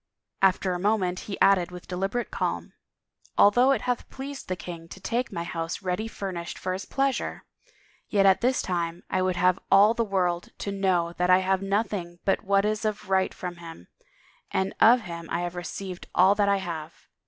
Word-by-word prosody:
After 190 -1 +3
a 175 - -3
moment 190 -2 +1
he 195 - -4
added 190 -3 +5
with 180 0 -10
deliberate 195 +6 -2
calm, - - -3 0.3
" - - -34
Al 205 - +7
though 245 +5 +4
it 275 - +2
hath 245 -1 -2
pleased 275 +1 -7
the 185 - -1
king 170 -2 -8
to 190 - -11
take 235 +5 -2
my 170 - -3
house 165 +1 -4
ready 185 +4 -1
furnished 185 -6 -5
for 185 - -3
his 190 +1 -5
pleasure, 275 -1 -1 0.6
yet 200 -2 +3
at 190 0 +5
this 255 +2 +2
time 170 -1 -2
I 185 - +1
would 185 -1 +1
have 180 +1 +3
all 205 +3 +6
the 230 - 0
world 180 -4 -1
to 200 - -4
know 185 -4 +1
that 180 0 +2
I 185 - +7
have 190 0 +1
nothing 195 -3 -2
but 195 - +1
what 200 0 +2
is 215 +1 -1
of 210 -2 -3
right 190 0 +3
from 180 -1 -6
him, 165 - -11 0.6
and 190 0 -1
of 240 +2 +7
him 170 -4 -8
I 170 - -1
have 175 0 -3
received 180 +1 -6
all 190 +2 +6
that 205 -1 +2
I 200 - +3
have. 165 -5 -7
190 Hz, 200 wpm, -26 LUFS, 175-205 Hz, 0.6 s, Al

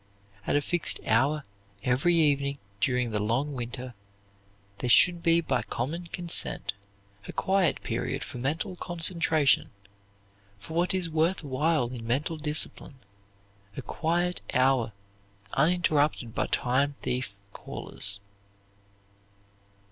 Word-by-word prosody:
At - - +1
a 145 - +3
fixed 175 +3 +2
hour 140 +7 +2 0.4
every 135 +8 +2
evening 140 -3 +2 0.2
during 125 +1 +1
the 105 - -1
long 120 +8 -1
winter 125 0 -5 0.9
there 125 - -2
should 175 +7 +6
be 165 0 +4
by 130 -6 0
common 165 +8 -4
consent 170 - +2 0.5
a - - -5
quiet 190 -5 +1
period - - -3
for 125 - -8
mental 160 - -2
concentration, 165 -4 +2 0.9
for 100 +10 -11
what 175 +3 +1
is 185 -2 0
worth 165 +3 0
while 145 -1 0
in 120 -2 -7
mental 145 +7 -1
discipline, 150 -1 -2 0.8
a - - -5
quiet 175 +2 -1
hour 130 -3 +3 0.6
uninterrupted 150 -6 +1
by - - -1
time 140 +3 0
thief 125 -5 -2 0.2
callers. 100 0 0
145 Hz, 115 wpm, -27 LUFS, 125-170 Hz, 0.9 s, should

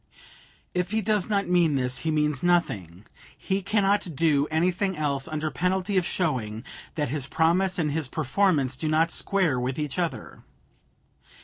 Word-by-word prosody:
If 180 0 -1
he 220 +2 0
does 210 -1 0
not 200 -2 +1
mean 175 -4 +3
this, 125 -1 0
he 160 - -2
means 150 -3 +1
nothing. 105 - 0 0.3
He 195 +1 -2
cannot 200 -3 +1
do 150 -2 +2
anything 180 +4 0
else 140 -2 -1
under 155 -1 -3
penalty 190 +2 -1
of 185 -2 +2
showing 120 - -2 0.3
that 150 -5 -1
his 140 0 -2
promise 175 +6 +2
and 155 -4 0
his 155 -2 -1
performance 150 -2 +1
do 155 - -3
not 160 +2 +2
square 175 -10 +1
with 125 +1 -2
each 150 +2 -3
other. 170 -2 -4
160 Hz, 155 wpm, -26 LUFS, 140-185 Hz, 0.3 s, mean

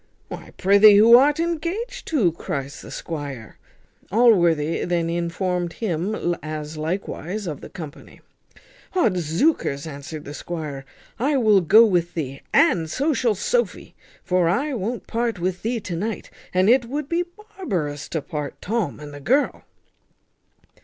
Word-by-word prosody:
"Why, - - -8
prithee, 200 +2 +7
who 225 +3 +8
art 285 +5 +5
engaged 345 +10 -3
to?" 235 - +2
cries 140 -4 -5
the - - -11
squire. 145 -8 -7 0.5
Allworthy 175 -9 +3
then 170 -1 0
informed 175 0 -2
him, 175 -1 -2
as 155 0 -6
likewise 180 +4 -4
of 155 -5 -5
the - - -9
company. 155 -4 -10 0.7
"Odzookers!" 175 - +1
answered 150 0 -8
the 145 - -7
squire, 150 -5 -6 0.3
"I 280 +4 +2
will 215 -6 +4
go 215 +7 +7
with 175 -5 0
thee, 135 -4 -4
and 165 -2 +3
so 285 - 0
shall 235 -5 +1
Sophy! 485 - -1 0.3
for 180 -2 +2
I 275 - 0
won't 230 +1 -3
part 230 -2 -1
with 180 +1 -2
thee 230 +1 -1
to 180 -3 -5
night; 210 +5 -4 0.2
and 185 +1 +2
it 245 +2 +5
would 280 +4 -4
be 340 +3 0 0.3
barbarous 155 - -3
to 160 -4 -3
part 150 -4 -5
Tom 205 -8 -2
and 145 -1 -9
the 145 - -8
girl." 260 - +1
180 Hz, 145 wpm, -23 LUFS, 160-235 Hz, 0.7 s, who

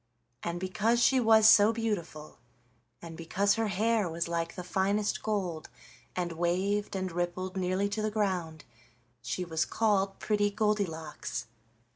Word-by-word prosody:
And 170 0 -3
because 195 +6 +1
she 260 +2 +4
was 220 -2 +6
so 215 0 +7
beautiful, 185 - -4 0.6
and 165 -1 -8
because 195 +5 +1
her 225 0 0
hair 210 0 +1
was 170 +1 -2
like 170 0 -2
the 180 - -6
finest 200 +3 0
gold, 185 -7 -3 0.5
and 175 -1 -2
waved 185 +5 -1
and 185 -1 -2
rippled 175 +2 -3
nearly 185 +1 0
to 210 +1 -3
the 215 - 0
ground, 185 -7 -2 0.6
she 125 +10 -3
was 160 -2 0
called 200 0 0
Pretty 205 -1 +1
Goldilocks. 195 - -2
190 Hz, 140 wpm, -30 LUFS, 170-210 Hz, 0.6 s, so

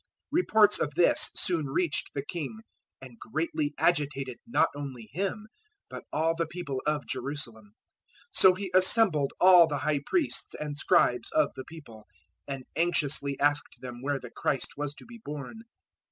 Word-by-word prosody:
002:003 - - -39 0.2
Reports 220 - +4
of 145 -1 -2
this 175 0 +3
soon 165 -5 +1
reached 155 +4 -1
the 140 0 -3
king, 175 +8 -5 0.4
and 120 -3 -12
greatly 150 +3 -2
agitated 140 -6 0
not 235 - +3
only 135 -6 -7
him 200 +7 -3 0.5
but - - -8
all 160 +2 +1
the 165 0 -2
people 150 -6 -5
of 150 -1 0
Jerusalem. 120 -5 -5
002:004 100 - -23 0.7
So 185 - +8
he 190 -1 -5
assembled 185 - +4
all 180 -2 +8
the 145 -2 -2
High 150 -1 0
Priests 340 - -1
and 150 -1 -5
Scribes 145 -6 +2
of - - +2
the 130 - -8
people, 125 -10 -13 0.4
and 135 -2 -5
anxiously 145 -4 0
asked 145 -3 0
them 125 -2 -8
where 140 +1 -1
the 125 -2 -10
Christ 135 - -1
was 145 0 -4
to - - -14
be 235 -1 -13
born. 150 - -7
150 Hz, 165 wpm, -28 LUFS, 135-175 Hz, 0.7 s, So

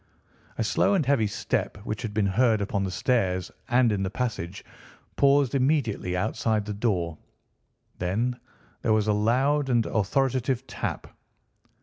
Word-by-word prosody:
A - - 0
slow 200 - +2
and 165 -7 +1
heavy 130 -5 +2
step, 100 - -2
which 110 -2 -3
had 115 -4 -4
been 105 -1 +1
heard 110 +3 +3
upon 100 0 -1
the - - -2
stairs 95 -3 0 0.2
and 120 -2 +4
in 100 -2 -1
the 95 - -1
passage, 100 -6 -4 0.5
paused 140 -1 +4
immediately 130 - +1
outside 110 +1 0
the 105 - -4
door. 90 -7 -1 0.8
Then 115 +8 -1 0.4
there 110 - +2
was 110 -1 +2
a 105 - +3
loud 135 +7 +2
and 120 -3 +2
authoritative 130 +4 0
tap. - - -5
110 Hz, 145 wpm, -26 LUFS, 100-130 Hz, 0.8 s, and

